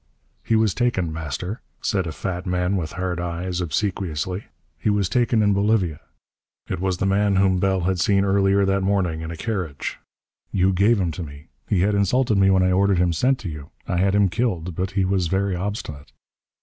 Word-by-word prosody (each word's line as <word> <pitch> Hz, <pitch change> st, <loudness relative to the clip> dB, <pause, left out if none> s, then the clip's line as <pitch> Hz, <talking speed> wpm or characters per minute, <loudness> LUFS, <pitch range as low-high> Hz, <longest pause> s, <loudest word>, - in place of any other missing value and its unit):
"He 115 Hz, -, +1 dB
was 110 Hz, -3 st, +3 dB
taken, 95 Hz, -10 st, 0 dB
Master," 80 Hz, -, -5 dB, 0.2 s
said 95 Hz, -5 st, -1 dB
a -, -, -3 dB
fat 90 Hz, +5 st, -4 dB
man 90 Hz, +1 st, 0 dB
with 80 Hz, -5 st, -3 dB
hard 90 Hz, -1 st, -2 dB
eyes, 90 Hz, +1 st, -3 dB
obsequiously, 90 Hz, +1 st, -2 dB, 0.3 s
"he -, -, 0 dB
was 100 Hz, -2 st, +2 dB
taken 115 Hz, +2 st, +2 dB
in 105 Hz, -1 st, +3 dB
Bolivia." 100 Hz, -6 st, +1 dB, 0.7 s
It -, -, -3 dB
was 95 Hz, -1 st, -1 dB
the -, -, -1 dB
man 100 Hz, +1 st, +2 dB
whom 95 Hz, -1 st, +3 dB
Bell 95 Hz, 0 st, +1 dB
had 90 Hz, +1 st, 0 dB
seen 100 Hz, +2 st, +3 dB
earlier 100 Hz, 0 st, +3 dB
that 95 Hz, 0 st, +1 dB
morning 95 Hz, -5 st, 0 dB
in 80 Hz, -, -5 dB
a 85 Hz, -, -6 dB
carriage. 90 Hz, -8 st, -4 dB, 0.5 s
"You 95 Hz, 0 st, +2 dB
gave 100 Hz, +4 st, +3 dB
him 90 Hz, -3 st, 0 dB
to 80 Hz, -, -6 dB
me. 75 Hz, -1 st, -10 dB, 0.2 s
He 100 Hz, -5 st, +2 dB
had 105 Hz, +3 st, +2 dB
insulted 105 Hz, +2 st, +2 dB
me 95 Hz, 0 st, +5 dB
when 95 Hz, -1 st, +4 dB
I 90 Hz, -, +3 dB
ordered 100 Hz, +1 st, +3 dB
him 90 Hz, -1 st, +2 dB
sent 130 Hz, +10 st, +2 dB
to 95 Hz, -, -4 dB
you. 75 Hz, -2 st, -8 dB, 0.2 s
I 90 Hz, -, -1 dB
had 95 Hz, +2 st, +2 dB
him 100 Hz, -1 st, +4 dB
killed, 90 Hz, -6 st, -1 dB
but 90 Hz, +3 st, -2 dB
he 95 Hz, -, +3 dB
was 95 Hz, -2 st, +1 dB
very 95 Hz, +1 st, 0 dB
obstinate." 90 Hz, -7 st, -5 dB
95 Hz, 200 wpm, -23 LUFS, 90-100 Hz, 0.7 s, me